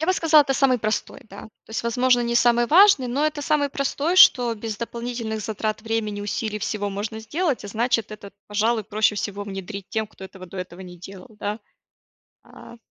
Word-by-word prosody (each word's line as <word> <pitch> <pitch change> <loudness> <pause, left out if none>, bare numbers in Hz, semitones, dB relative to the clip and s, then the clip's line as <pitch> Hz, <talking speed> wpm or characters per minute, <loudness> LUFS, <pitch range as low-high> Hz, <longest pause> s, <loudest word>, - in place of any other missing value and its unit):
Я 315 - -1
бы 370 - +3
сказала, 315 -4 +5
это 270 -1 -1
самый 260 -3 +3
простой, 215 0 -3
да. 200 - -10
То 220 - -17
есть, 220 - -3
возможно, 245 +1 +2
не 235 0 -1
самый 240 0 +4
важный, 345 - +6
но 275 +5 -1
это 310 -1 -1
самый 290 -1 +1
простой, 285 +5 -1
что 245 -8 +7
без 220 0 -5
дополнительных 235 -1 -5
затрат 215 +1 -3
времени, 220 -2 -2
усилий, 210 +1 -3
всего 205 0 -3
можно 210 +3 -5
сделать. 290 - -2
А 205 - -6
значит, 230 0 0
это, 205 -2 -10 0.2
пожалуй, 220 +2 +1
проще 215 +1 +1
всего 205 0 -4
внедрить 195 0 -7
тем, 220 -2 -1
кто 190 - -12
этого 190 -1 -11
до 190 - -11
этого 180 0 -7
не 180 -1 -11
делал, 195 +3 -12
да. 210 +1 -4 0.8
А, 235 - -14
220 Hz, 195 wpm, -23 LUFS, 205-250 Hz, 0.8 s, что